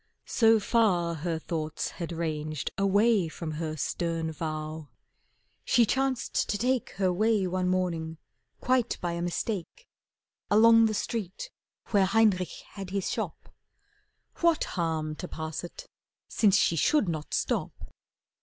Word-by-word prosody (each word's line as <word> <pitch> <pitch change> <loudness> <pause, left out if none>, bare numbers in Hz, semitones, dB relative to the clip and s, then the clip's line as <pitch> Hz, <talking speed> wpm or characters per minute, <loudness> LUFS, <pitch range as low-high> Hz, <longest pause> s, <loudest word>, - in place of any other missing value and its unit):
So 225 -2 +4
far 195 -6 +2
her 165 +1 -2
thoughts 155 -1 -3
had 170 - -3
ranged 155 -3 -3
Away 200 0 +3
from 160 0 -6
her 155 0 -4
stern 165 +2 -2
vow, 155 -1 -5 0.7
she 235 - +4
chanced 265 +2 0
to 205 - 0
take 250 +3 0
Her 185 -2 +1
way, 215 +1 +2
one 185 0 -1
morning, 170 -3 -1 0.4
quite 250 -2 +1
by 175 - -2
a 170 0 -3
mistake, 195 - -3 0.6
Along 225 +2 +6
the 215 - -2
street 225 - -4 0.4
where 200 -2 +4
Heinrich 195 -4 +2
had 195 -2 -7
his 195 -1 -2
shop. - - -5 0.8
What 335 -2 +3
harm 160 -3 -2
to 180 - -6
pass 160 -1 -5
it 175 - -9 0.4
since 205 -3 +3
she 170 - +3
should 235 - +3
not 155 -3 -3
stop! - - -3
180 Hz, 135 wpm, -28 LUFS, 160-220 Hz, 0.8 s, Along